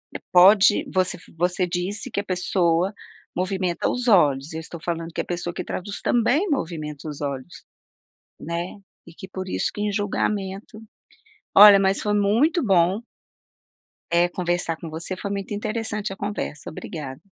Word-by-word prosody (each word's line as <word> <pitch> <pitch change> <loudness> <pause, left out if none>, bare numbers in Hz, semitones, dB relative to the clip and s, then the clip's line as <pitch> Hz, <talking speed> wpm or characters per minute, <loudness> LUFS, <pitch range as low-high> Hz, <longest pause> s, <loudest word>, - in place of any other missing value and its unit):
hã, - - -3
pode, 190 +3 +7
você 185 -1 +1 0.2
você 180 +2 +1
disse 185 +4 -3
que - - -1
a - - -2
pessoa 180 0 +1 0.4
movimenta 185 -1 -1
os 250 0 -2
olhos, 145 -7 +4
eu 160 - -4
estou 165 +1 -8
falando 165 -1 -3
que - - -1
a - - -8
pessoa 175 0 -4
que - - -4
traduz 200 +2 -5
também 245 - +2
movimenta 160 - -3
os 150 -1 -8
olhos, 140 +3 -5 0.8
né, 170 +4 -5 0.3
e 165 - -12
que 190 - -10
por 190 0 -6
isso - - -1
que 205 - -5
em 210 0 0
julgamento, 205 0 -2 0.8
olha, 205 0 +10
mas 195 0 +2
foi 210 - 0
muito 230 - +2
bom 190 -1 +3 1.1
eh, 170 +1 +3
conversar 175 -2 -1
com 165 - -7
você, 170 +4 -4
foi 200 - -5
muito 200 0 -4
interessante 215 -1 -2
a - - -8
conversa, 200 -7 -5
obrigada. 145 -5 -7
185 Hz, 160 wpm, -23 LUFS, 170-205 Hz, 1.1 s, olha